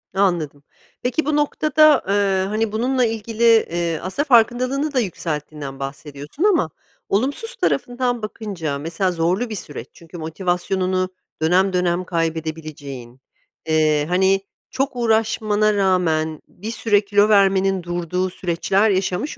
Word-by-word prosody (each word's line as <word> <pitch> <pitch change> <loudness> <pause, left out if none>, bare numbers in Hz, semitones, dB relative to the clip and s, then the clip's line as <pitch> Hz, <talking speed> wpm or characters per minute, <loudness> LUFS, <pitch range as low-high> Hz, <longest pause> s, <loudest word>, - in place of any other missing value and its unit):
Anladım. 170 -7 0 0.4
Peki 255 +5 -1
bu 300 0 +1
noktada, 305 0 +3
eee, 195 -1 +1
hani, 215 +1 -1
bununla 250 +3 +1
ilgili, 225 +1 -3
eee, 175 -8 +3
aslında 190 +11 -1
farkındalığını 255 +3 +2
da 255 - +2
yükselttiğinden 150 - -4
bahsediyorsun 145 - -6
ama 350 - +3 0.4
olumsuz 280 - -1
tarafından 245 -1 -1
bakınca 195 -9 -4
mesela 170 +6 -1
zorlu 180 +8 0
bir 215 - -4
süreç. 140 -8 -6
Çünkü 170 +1 -12
motivasyonunu 185 +3 -1 0.3
dönem 185 +4 +3
dönem 180 0 +1
kaybedebileceğin, 155 -7 -4 0.5
eee, 155 -2 +2
hani, 190 +2 +3 0.3
çok 270 +1 -1
uğraşmana 220 -2 +1
rağmen 170 -6 +1
bir 215 +5 -7
süre 215 -3 +2
kilo 205 +1 +3
vermenin 195 -2 +3
durduğu 175 +2 -2
süreçler 190 +4 +1
yaşamış 190 +7 -1
190 Hz, 120 wpm, -21 LUFS, 165-225 Hz, 0.5 s, noktada